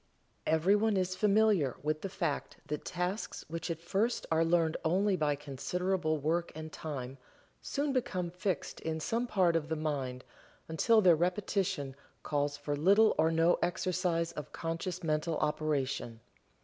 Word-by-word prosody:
Everyone 200 +7 +3
is 185 0 0
familiar 205 - +3
with 155 +1 -1
the 195 - -3
fact 170 -6 -3
that 150 0 -4
tasks 180 +4 -3
which 165 +2 -5
at 165 -1 -2
first 210 +7 0
are 160 0 +4
learned 165 -1 +2
only 190 +4 +2
by 150 -4 +1
considerable 155 +4 -1
work 165 +4 0
and 155 -1 -7
time 135 -4 -6 0.4
soon 285 0 -1
become 185 -9 -1
fixed 180 -1 -3
in 160 0 -2
some 230 +9 -1
part 180 -6 +3
of 155 -2 -1
the 160 - 0
mind 140 -5 -3 0.4
until 215 +8 +4
their 180 -4 +6
repetition 180 -5 -1 0.3
calls 145 -1 -1
for 145 0 -2
little 200 +9 +5
or 160 +1 +5
no 165 +1 +3
exercise 175 -1 0
of 150 -4 -7
conscious 170 +2 -4
mental 155 +1 0
operation. 145 -6 -1
165 Hz, 150 wpm, -32 LUFS, 150-185 Hz, 0.4 s, their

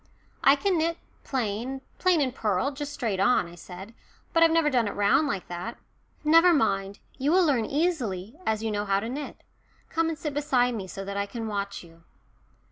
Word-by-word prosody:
"I 275 - +7
can 370 +2 +1
knit 330 +1 0 0.3
plain 250 +1 -2 0.2
plain 365 -4 +3
and 260 -3 0
purl 215 +2 0
just 290 +1 -6
straight 220 -9 -2
on," 245 -1 +3
I 170 - -12
said. 180 +5 -10 0.4
"But 330 - +3
I've 330 - +7
never 325 -2 +3
done 240 -4 +2
it - - -4
round 205 +9 +3
like 195 -10 -3
that." 175 +7 -6 0.5
"Never 330 +3 +6
mind, 195 -7 0 0.2
you 280 +3 +1
will 365 +1 +5
learn 260 -8 +2
easily, 250 - -1
as 220 -5 -1
you 220 - -1
know 205 0 -1
how 195 -1 +2
to 225 +3 -4
knit. 285 +3 -6 0.5
Come 330 0 +1
and 320 - -3
sit 300 -2 -4
beside 255 -4 +2
me, 200 -5 -5
so 195 +1 -7
that 200 0 -4
I 200 0 -1
can 230 +2 -5
watch 200 -3 -3
you." 165 -1 -17
245 Hz, 205 wpm, -27 LUFS, 200-300 Hz, 0.5 s, I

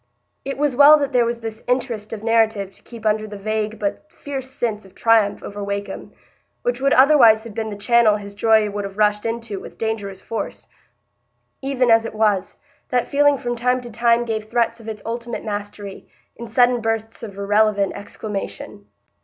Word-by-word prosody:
It 275 - -4
was 290 -2 0
well 290 +3 +8
that 280 -2 -2
there 245 -1 +4
was 235 0 -3
this 225 -1 -6
interest 245 -4 -1
of 220 -2 -6
narrative 220 -3 +2
to - - -15
keep 230 -2 -12
under 215 0 +1
the 205 -1 -8
vague 215 +1 -2
but 215 +9 -4
fierce 270 -2 -6
sense 225 -5 -3
of 190 - -18
triumph 225 -3 +2
over 205 0 -6
Wakem, 200 0 -5 0.5
which 245 +1 -1
would 275 +1 +3
otherwise 255 -6 +6
have 230 -2 -9
been 220 0 -3
the 205 - -6
channel 225 0 +4
his 200 -1 -7
joy 220 0 +3
would 205 0 -4
have 195 0 -7
rushed 210 +1 +2
into 230 -3 -4
with - - -12
dangerous 205 -4 -3
force. 225 - -5 1.0
Even 265 -3 +1
as 225 0 +5
it 225 - -6
was, 210 -3 +1 0.3
that 250 -2 0
feeling 290 0 +4
from 240 -1 -3
time 250 +2 +1
to 240 -1 -9
time 235 +1 +2
gave 220 -2 -3
threats 230 0 0
of 225 - -13
its 215 -1 -7
ultimate 235 +1 -5
mastery, 205 -1 -6 0.3
in 235 - -8
sudden 245 +1 +3
bursts 225 0 -3
of 200 -4 -8
irrelevant 205 0 +2
exclamation. 200 0 -7
225 Hz, 185 wpm, -21 LUFS, 210-240 Hz, 1.0 s, well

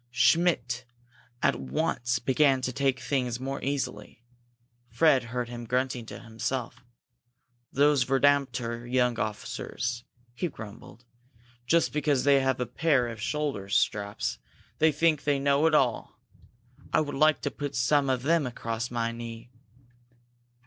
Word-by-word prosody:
Schmidt 125 -1 +2 0.6
at - - +3
once 120 - -1
began 135 +2 +3
to 130 - -1
take 135 -2 +1
things 125 -2 -1
more 135 +1 -4
easily. 125 -5 -4 0.7
Fred 145 -7 +3
heard 120 0 -3
him 120 0 -7
grunting 125 -1 -1
to - - -8
himself. 120 +2 -4 0.9
"Those 145 0 +3
verdamter 130 -3 +1
young 125 -2 +2
officers!" 115 +2 -3 0.3
he 175 - -2
grumbled. 110 -2 -11 0.6
"Just 170 +4 +2
because 145 -3 +1
they 140 -1 +5
have 130 -1 0
a 125 - 0
pair 125 0 +1
of 115 -2 -8
shoulder 140 -7 -2
straps, 100 - 0 0.4
they 160 0 +5
think 155 0 +2
they 145 -1 +2
know 140 +3 +3
it 155 - +3
all! 125 -6 0 0.7
I - - +3
would 145 -2 -2
like 150 -3 +3
to - - -1
put 145 -1 -5
some 135 +3 +2
of 130 -1 0
them 160 -1 +2
across 115 -1 -4
my 115 -1 -1
knee!" 115 0 -8
130 Hz, 135 wpm, -28 LUFS, 120-145 Hz, 0.9 s, they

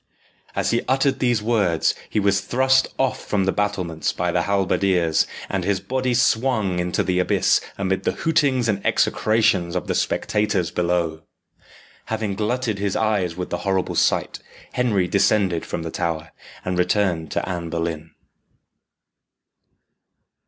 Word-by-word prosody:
As - - 0
he 115 - +2
uttered 135 0 +2
these 120 -4 +1
words, 100 -8 +2 0.2
he - - 0
was 100 -1 +2
thrust 130 +1 +3
off 135 0 0
from 100 -2 0
the 95 - +2
battlements 90 -7 -1
by 90 0 -1
the 90 - +1
halberdiers, 95 -4 +1 0.2
and 95 -2 -2
his 100 0 0
body 125 +5 -1
swung 110 -7 +1
into 90 0 0
the 90 0 0
abyss 90 - +2 0.2
amid 95 -1 -1
the - - 0
hootings 140 -7 +1
and 100 -3 -1
execrations 100 -6 +2
of - - -2
the - - -1
spectators 100 -5 0
below. 85 -2 -1 0.8
Having 110 -2 -2
glutted 110 +1 -1
his 100 -1 -1
eyes 100 -6 0
with 90 - -5
the - - -2
horrible 95 -2 -1
sight, - - +1 0.3
Henry 105 -8 +1
descended 100 -3 +2
from 85 - -4
the 80 - -5
tower, 80 -2 -3 0.3
and 90 0 -1
returned 90 -3 +1
to - - -2
Anne 85 -2 -4
Boleyn. 80 -1 -3
100 Hz, 145 wpm, -22 LUFS, 90-110 Hz, 0.8 s, thrust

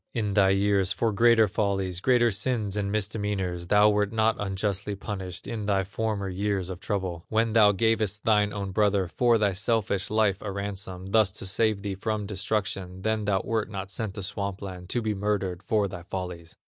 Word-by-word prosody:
In 105 -4 -1
thy 95 -1 +5
years, 100 -1 +2
for 115 +2 +1
greater 115 +1 +5
follies, 95 -3 -1
Greater 120 +2 +3
sins 105 0 -1
and 100 -1 -1
misdemeanors, 100 -4 -2
Thou 105 +2 +5
wert 105 -1 +1
not 110 0 +2
unjustly 100 0 -2
punished. 95 -3 -6
In 110 -3 -4
thy 100 -2 +2
former 100 0 -2
years 95 -1 -2
of 90 - -7
trouble, 95 -5 -3
When 110 0 +1
thou 105 -3 +6
gavest 105 0 0
thine 105 -2 +3
own 100 -2 -4
brother, 100 -2 +2
For 120 +6 +3
thy 105 -3 +1
selfish 100 -1 0
life 105 -3 +2
a 105 - -4
ransom, 95 -1 -5
Thus 110 -3 +4
to - - -6
save 105 +1 +1
thee 100 -2 -2
from 105 +2 -2
destruction, 95 -2 -3
Then 110 -1 0
thou 100 -2 +1
wert 110 -2 -1
not 95 -1 -6
sent 105 -1 -4
to 100 - -5
Swamp 100 0 -4
land 90 -2 -8
To 120 +2 -1
be 110 -1 0
murdered 100 -3 -1
for 100 +1 +1
thy 90 -2 -7
follies. 90 -2 -6
100 Hz, 190 wpm, -27 LUFS, 95-110 Hz, -, thou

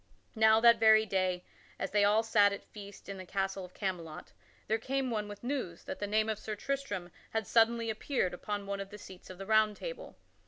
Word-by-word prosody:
Now 220 -1 +5
that 235 -1 +7
very 220 -1 +6
day, 185 -3 -1 0.3
as 195 - -3
they 205 0 +3
all 210 +2 +4
sat 210 -2 +4
at 200 - -6
feast 205 -1 -12
in 195 -1 -6
the - - -6
castle 195 0 -2
of 180 0 -12
Camelot, 175 -6 -5 0.3
there 220 +1 0
came 265 +2 -1
one 210 -2 -2
with 205 +1 -10
news 245 -10 -3
that - - -6
the 205 - -2
name 215 +1 +2
of 215 -1 -2
Sir 215 0 -5
Tristram 265 -8 -3 0.2
had 220 -1 -2
suddenly 230 +1 +3
appeared 220 -4 -1
upon 205 +2 -4
one 200 0 -3
of 195 0 -6
the 210 - -9
seats 190 -3 -12
of 185 - -9
the 195 - -7
Round 215 0 +3
Table. - - -7
210 Hz, 220 wpm, -32 LUFS, 195-225 Hz, 0.3 s, that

